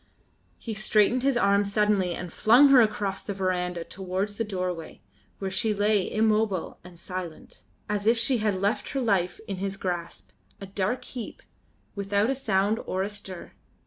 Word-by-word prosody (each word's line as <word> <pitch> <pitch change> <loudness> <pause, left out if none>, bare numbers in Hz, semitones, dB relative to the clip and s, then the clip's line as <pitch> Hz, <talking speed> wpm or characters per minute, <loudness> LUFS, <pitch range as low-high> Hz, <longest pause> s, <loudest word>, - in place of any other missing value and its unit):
He 225 - -6
straightened 215 +3 +2
his 270 -1 +2
arm 200 -2 +3
suddenly 200 -3 +1
and 175 -2 -7
flung 250 +6 +6
her 265 -2 +8
across 205 -3 0
the 200 - -5
verandah 180 -2 -1
towards 190 +3 -4
the 230 - 0
doorway, 180 -5 -4 0.4
where 195 -1 -4
she 210 +3 0
lay 205 -1 +2
immobile 215 -4 +1
and 180 -1 -13
silent, 180 -2 -7 0.3
as 205 0 -2
if 230 +1 +5
she 250 +1 +1
had 210 -3 0
left 200 +3 -1
her 275 - 0
life 195 -7 +1
in 195 - -4
his 195 +1 -3
grasp, 175 -3 -4 0.3
a 200 - -7
dark 195 +5 -2
heap, 245 -4 -7 0.5
without 200 +3 0
a - - +2
sound 215 -4 +1
or 190 +1 -1
a 200 - -3
stir. 190 -3 -8
200 Hz, 170 wpm, -26 LUFS, 185-215 Hz, 0.5 s, her